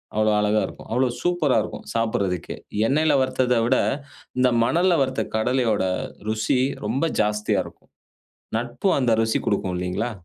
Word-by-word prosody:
அவ்வளோ 110 0 +3
அழகா 105 +1 +2
இருக்கும். - - -12
அவ்ளோ 130 0 +3
சூப்பரா 175 -6 +2
இருக்கும். - - -8
சாப்பிட்றதுக்கே 100 -6 -1 0.3
எண்ணெயில 155 +2 +2
வறுத்தத 130 -1 +1
விட 130 - +3 0.6
இந்த 125 0 +5 0.2
மணல்ல 175 +6 +3
வறுத்த 130 0 -2
கடலையோட 115 -3 +1 0.5
ருசி 110 +3 +1 0.3
ரொம்ப 125 +7 -1 0.2
ஜாஸ்தியா 105 0 +1
இருக்கும். - - -15 0.7
நட்பும் 120 +10 0
அந்த 120 -3 +2
ருசி 110 0 +1
குடுக்கும் 95 -3 0
இல்லைங்களா? 90 +7 -2
120 Hz, 135 wpm, -23 LUFS, 105-130 Hz, 0.7 s, இந்த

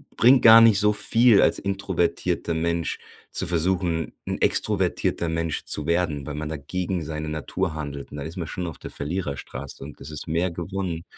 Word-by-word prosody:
bringt 125 +2 +5
gar 115 0 +10
nicht 110 -3 +6
so 105 0 +4
viel 110 +1 +4
als - - +3
introvertierter 95 -3 -1
Mensch 85 +1 -1 0.3
zu - - -2
versuchen, 85 -1 0
'n - - -2
extrovertierter 85 - +1
Mensch 80 -1 -2
zu 75 +1 -2
werden, 85 -5 0
weil 75 - -5
man 75 +1 -4
da 80 - -4
gegen 90 +4 -3
seine 75 0 -5
Natur 80 +3 -3
handelt 70 -2 -6
und - - -7
da 70 - -5
ist 80 +4 -8
man 85 - -3
schon 90 +2 -5
auf 80 - -7
der - - -9
Verliererstraße. 70 -4 -5
Und 70 +1 -10
es 70 - -8
ist 75 - -7
mehr 85 +3 0
gewonnen, 85 -1 -4
85 Hz, 190 wpm, -24 LUFS, 75-95 Hz, 0.3 s, gar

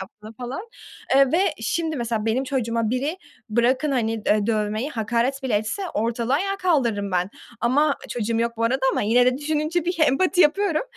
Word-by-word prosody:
yaptığım 210 +3 -11
falan, 255 - -7 0.5
eee, 275 -1 +5
ve 335 - +3 0.2
şimdi, 315 +8 -1
mesela, 230 -3 -2
benim 240 +4 +1
çocuğuma 230 -4 -1
biri, 280 +8 -2 0.3
bırakın, 250 +6 +2
hani, 230 -4 0
eee, 210 -1 +2
dövmeyi, 215 +4 -1
hakaret 240 +3 -1
bile 255 -5 -1
etse 395 - -3
ortalığı 230 +3 0
ayağa 390 +6 0
kaldırırım 240 - 0
ben. 180 +1 0 0.3
Ama, 280 +4 +2
çocuğum 230 -1 -1
yok 235 0 -1
bu 230 - -3
arada 260 +4 +1
ama - - 0
yine 245 +4 +4
de 255 +1 +2
düşününce 310 +3 -1
bir 355 +1 -1
empati 355 +5 +3
yapıyorum. 335 +1 +3
250 Hz, 175 wpm, -23 LUFS, 225-300 Hz, 0.5 s, eee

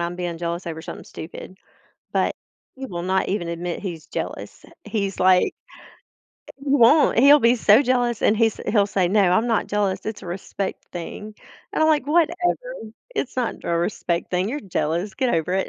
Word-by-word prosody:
I'm 170 +1 -3
being 175 -2 -4
jealous 170 +1 -4
over 160 -1 -5
something - - -8
stupid, 170 +3 -9 0.6
but - - +1 0.4
he 265 0 -7
will 175 -5 -5
not 190 +1 0
even 185 -4 -2
admit 170 +1 -4
he's 170 -5 -6
jealous. - - -6 0.2
He's, 200 -4 -3
like 185 0 +4 1.0
he 275 - -14
won't. 275 -1 +5
He'll 280 +4 +8
be 235 -2 +4
so 220 +4 +5
jealous, 245 -3 +1
and 215 - +4
he's 225 -1 +2
he'll 205 -2 +3
say, 190 -3 +1
"No, 195 -2 +3
I'm 220 +6 +2
not 225 -3 +1
jealous. 200 -2 -1
It's 220 -1 -5
a - - -9
respect 190 +2 -5
thing," 210 +5 -7 0.4
and - - +1
I'm 315 - +4
like, 295 -3 +2
"Whatever. 345 - 0 0.2
It's 260 - -3
not 245 -3 -1
a 170 - 0
respect 170 -1 -2
thing. 180 +3 0
You're 290 +5 -3
jealous. 180 +1 -2
Get 255 +2 0
over 165 +2 -1
it." 190 - 0
200 Hz, 185 wpm, -23 LUFS, 175-240 Hz, 1.0 s, He'll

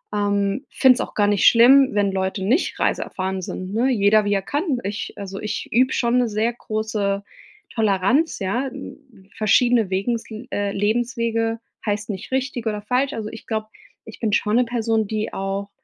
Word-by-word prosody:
ähm, 205 +3 0
finde 260 -2 +5
es - - -3
auch - - -5
gar 205 -1 +3
nicht 205 -2 +2
schlimm, 260 +3 +7
wenn 205 -1 +1
Leute 190 0 -2
nicht 260 - +1
reiseerfahren 190 0 -1
sind, 185 +1 -6
ne? 240 +5 +2
Jeder, 210 -2 +4
wie 205 - +1
er 195 - +1
kann. 290 - -1
Ich 205 +1 -4
also, 195 -1 -6
ich 215 - -4
übe 255 +3 +3
schon 240 0 +1
'ne 245 -2 +1
sehr 220 +3 0
große 215 -3 -2 0.5
Toleranz, 225 - +1
ja. 230 +7 -1
N 260 -6 -12
Verschiedene 225 0 +3
Wegensl 225 +4 -3
äh, 205 -5 -1
Lebenswege 230 +1 0 0.3
heißt 210 0 -2
nicht 195 +2 -6
richtig 260 -2 -2
oder 210 -1 -2
falsch. 255 +6 0
Also, 215 -4 -4
ich 225 - -11
glaube, 220 -1 -2 0.4
ich 220 - -11
bin 220 -3 -1
schon 210 +1 +1
'ne 250 - +3
Person, 225 -2 0
die 215 +1 -3
auch 195 +1 -3
220 Hz, 180 wpm, -22 LUFS, 200-240 Hz, 0.5 s, schlimm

